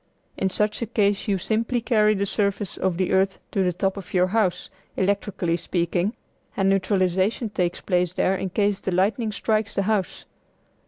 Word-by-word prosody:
In 190 - 0
such 210 +4 -1
a 235 - -1
case 205 -2 +1
you 200 -2 +2
simply 225 +6 0
carry 215 -3 +3
the 200 0 0
surface 200 -1 -1
of 185 -3 -1
the 185 -1 0
earth 190 +1 +2
to 195 -4 +1
the 180 - +2
top 190 +3 -1
of 195 - -7
your 180 0 +5
house, 190 -1 0 0.3
electrically 190 -3 0
speaking, 175 +4 -1 0.4
and 195 - +2
neutralization 195 +3 +1
takes 180 -3 -1
place 180 -2 0
there 190 +1 +1
in 190 - -3
case 200 +1 +1
the 190 - -3
lightning 210 +5 +1
strikes 215 0 -1
the 200 - +1
house. 205 -2 -1
195 Hz, 175 wpm, -24 LUFS, 185-210 Hz, 0.4 s, your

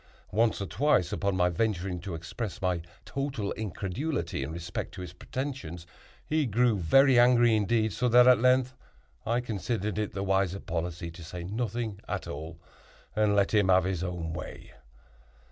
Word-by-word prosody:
Once 110 +2 +2
or 100 - -2
twice, 95 - +2
upon 100 -1 0
my 90 -1 +4
venturing 90 -1 -1
to 90 -1 -5
express 90 +6 -5
my 90 -2 0 0.2
total 135 -7 -3
incredulity 105 - -3
in 70 +3 -4
respect 85 +1 -5
to - - -7
his 90 -1 -7
pretensions, 125 - -5 0.4
he 155 -3 +1
grew 120 +1 +3
very 130 - +5
angry 120 -2 +5
indeed, 110 +1 +1
so 125 -1 +1
that 125 +1 +7
at 125 - +7
length 130 0 +3 0.5
I 120 +2 +1
considered 105 -2 -2
it 105 - -2
the 95 - -3
wiser 95 -1 +1
policy 85 -1 -4
to 85 0 -11
say 85 +2 -7
nothing 110 +1 -3
at - - -3
all, 80 +3 -7 0.6
and 105 -1 +3
let 100 +1 +2
him 105 -3 +4
have 95 0 +5
his 90 -1 -2
own 85 -3 -4
way. - - -8
100 Hz, 165 wpm, -29 LUFS, 90-120 Hz, 0.6 s, that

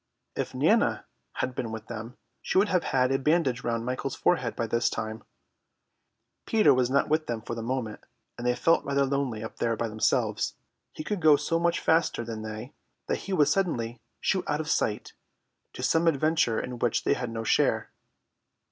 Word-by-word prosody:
If - - -3
Nana - - +2 0.3
had 130 - -2
been 115 -2 -4
with 110 -1 -6
them, 115 +2 -7 0.2
she - - -1
would 205 +2 +4
have 180 -2 +1
had 130 -1 +2
a 135 - +2
bandage 140 -4 +1
round 115 -1 -1
Michael's 130 +2 -3
forehead 125 -10 +1
by 115 - -1
this 115 +1 +1
time. 110 0 -5 1.2
Peter 220 -2 +5
was 125 -1 +2
not 140 +1 +2
with 155 0 +1
them 115 -2 -3
for 120 - -5
the 115 - -4
moment, 115 -2 -3 0.3
and 120 0 -4
they 125 - +2
felt 165 +7 +3
rather 140 0 +1
lonely 135 -5 -1
up 110 - -8
there 115 -1 0
by 115 - -1
themselves. 110 0 0 0.4
He - - -7
could 205 +2 -3
go 155 -2 +7
so 150 +3 0
much 170 0 +1
faster 160 -7 +1
than 110 -1 -5
they 110 +4 -7 0.3
that - - -1
he - - -1
would 150 -5 +4
suddenly 120 - -1 0.2
shoot 190 - 0
out 150 0 0
of 155 0 -2
sight, 105 - -1 0.6
to - - -7
have - - 0
some 165 +1 +2
adventure 155 -6 +2
in 125 -1 -5
which 120 -2 +1
they - - +3
had 125 - -3
no 115 0 -4
share. - - +1
125 Hz, 195 wpm, -27 LUFS, 115-155 Hz, 1.2 s, go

